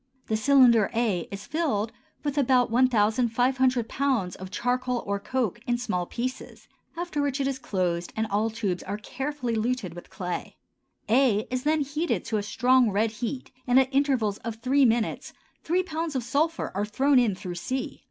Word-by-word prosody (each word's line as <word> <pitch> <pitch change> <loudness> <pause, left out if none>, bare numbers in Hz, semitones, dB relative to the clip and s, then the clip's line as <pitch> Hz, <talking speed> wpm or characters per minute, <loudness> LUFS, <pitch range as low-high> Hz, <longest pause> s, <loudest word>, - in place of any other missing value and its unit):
The 220 - -1
cylinder 240 -3 +5
a 215 -8 0
is 200 0 -7
filled 275 -9 -1 0.3
with 290 -2 -2
about 255 -4 +3
1,500 245 +1 +2
pounds 255 -11 0
of 190 0 -8
charcoal 250 +2 -1
or 200 0 -1
coke 235 -1 -2
in 240 0 +1
small 180 -8 -2
pieces, 255 +2 -5 0.3
after 340 -4 -2
which 285 -1 -1
it 270 - +1
is 270 -1 -2
closed 180 -6 -2
and 220 - 0
all 215 +1 0
tubes 205 -5 -2
are 205 - -4
carefully 260 +3 -4
luted 225 -5 -1
with 175 - -11
clay; 180 -3 -5 0.5
a 225 -2 +3
is 255 +1 -2
then 310 0 +2
heated 295 +4 -1
to 220 - -1
a - - 0
strong 250 +3 +3
red 210 +2 +1
heat 240 +4 -5 0.2
and 250 +1 +6
at 265 0 +1
intervals 260 -7 +1
of 230 -1 -5
three 260 +4 +3
minutes 230 -1 0 0.3
3 360 +3 +1
pounds 320 -3 -4
of 255 - -1
sulphur 310 +6 0
are 200 +2 -1
thrown 265 +6 +3
in 225 -6 +2
through 185 -1 -6
c. 255 +10 -4
245 Hz, 175 wpm, -26 LUFS, 215-270 Hz, 0.5 s, and